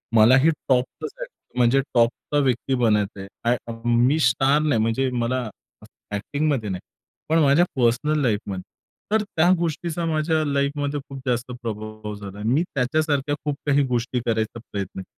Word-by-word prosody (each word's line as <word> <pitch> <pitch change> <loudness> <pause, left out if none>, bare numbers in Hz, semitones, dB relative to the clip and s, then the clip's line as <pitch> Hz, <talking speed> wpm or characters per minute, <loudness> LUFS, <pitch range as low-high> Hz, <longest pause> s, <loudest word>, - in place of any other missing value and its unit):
मला 115 +4 +7
ही 160 - +6 0.2
टॉप 125 -1 +4 0.2
ला - - -1
जायचंय, - - -12
म्हणजे 120 +3 +4
टॉपचा 120 +5 +1
व्यक्ती 130 0 0
बनायचं 105 -3 +1 0.2
आहे. 120 +1 +3 0.4
मी 125 +6 +3
स्टार 135 +2 +3
नाही, 145 -8 +2
म्हणजे 115 +4 +1
मला 125 -1 -1 0.7
एक्टिंग 145 +9 -2
मध्ये 120 -8 -1
नाही, 90 -1 -4 0.5
पण 160 +1 +4
माझ्या 145 +5 +5
पर्सनल 130 +5 +2
लाईफमध्ये. 100 -5 -1 0.5
तर 220 0 +3
त्या 175 -4 +1
गोष्टीचा 170 0 -2
माझ्या 155 0 +1
लाईफमध्ये 145 0 -1
खूप 135 -1 -7
जास्त 125 0 -1
प्रभाव 110 -1 -6
झाला. 100 -1 -9
मी 130 +9 +3
त्याच्यासारख्या 145 +2 +1
खूप 145 -1 0
काही 145 -1 +3
गोष्टी 125 0 -1
करायचा 110 0 -1
प्रयत्न 100 -2 -4
केला. - - -8
130 Hz, 155 wpm, -23 LUFS, 115-150 Hz, 0.7 s, मला